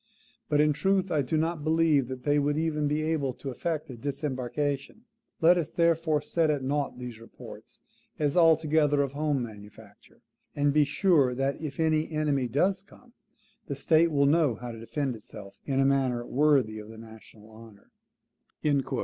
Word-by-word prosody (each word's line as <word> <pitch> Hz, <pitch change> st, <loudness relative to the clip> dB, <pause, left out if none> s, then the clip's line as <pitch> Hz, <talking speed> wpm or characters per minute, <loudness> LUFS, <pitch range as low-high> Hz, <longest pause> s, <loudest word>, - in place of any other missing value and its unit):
BUT 145 Hz, -, +2 dB
IN 150 Hz, 0 st, +4 dB
TRUTH 190 Hz, +3 st, 0 dB
I 155 Hz, -3 st, +2 dB
DO 140 Hz, +4 st, -1 dB
NOT 160 Hz, -1 st, -1 dB
BELIEVE 155 Hz, -4 st, +2 dB
THAT 130 Hz, -1 st, -7 dB
THEY 145 Hz, 0 st, +2 dB
WOULD 145 Hz, +1 st, 0 dB
EVEN 155 Hz, -2 st, 0 dB
BE 150 Hz, +1 st, -1 dB
ABLE 155 Hz, -5 st, -1 dB
TO 130 Hz, +2 st, -6 dB
EFFECT 155 Hz, +3 st, -3 dB
A 125 Hz, -, -9 dB
DISEMBARKATION. 140 Hz, -, -3 dB, 0.4 s
LET 175 Hz, +2 st, +5 dB
US, 160 Hz, -, -3 dB
THEREFORE, 165 Hz, -2 st, +1 dB
SET 165 Hz, -2 st, 0 dB
AT 145 Hz, -3 st, 0 dB
NOUGHT 140 Hz, 0 st, -2 dB
THESE 125 Hz, -3 st, -8 dB
REPORTS 115 Hz, -, -13 dB, 0.4 s
AS 145 Hz, -2 st, 0 dB
ALTOGETHER 155 Hz, -3 st, +3 dB
OF 140 Hz, -, -4 dB
HOME 145 Hz, -2 st, -1 dB
MANUFACTURE; 105 Hz, -1 st, -13 dB, 0.3 s
AND 145 Hz, -1 st, +1 dB
BE 150 Hz, 0 st, +4 dB
SURE 145 Hz, -5 st, +2 dB
THAT 135 Hz, +3 st, -2 dB
IF 155 Hz, -1 st, -6 dB
ANY 155 Hz, -1 st, +1 dB
ENEMY 150 Hz, -4 st, 0 dB
DOES 185 Hz, -, +1 dB
COME, 235 Hz, +4 st, -20 dB, 0.5 s
THE 140 Hz, -, -3 dB
STATE 160 Hz, +4 st, +3 dB
WILL 140 Hz, -3 st, +2 dB
KNOW 145 Hz, -4 st, +3 dB
HOW 120 Hz, +3 st, -7 dB
TO 115 Hz, -, -9 dB
DEFEND 130 Hz, +3 st, -3 dB
ITSELF 100 Hz, -2 st, -12 dB
IN 135 Hz, -1 st, 0 dB
A 135 Hz, -, +3 dB
MANNER 130 Hz, -3 st, +1 dB
WORTHY 135 Hz, -7 st, +2 dB
OF 105 Hz, 0 st, -10 dB
THE 110 Hz, -, -11 dB
NATIONAL 110 Hz, -1 st, -14 dB
HONOUR." 110 Hz, -3 st, -16 dB
145 Hz, 175 wpm, -27 LUFS, 125-155 Hz, 0.5 s, LET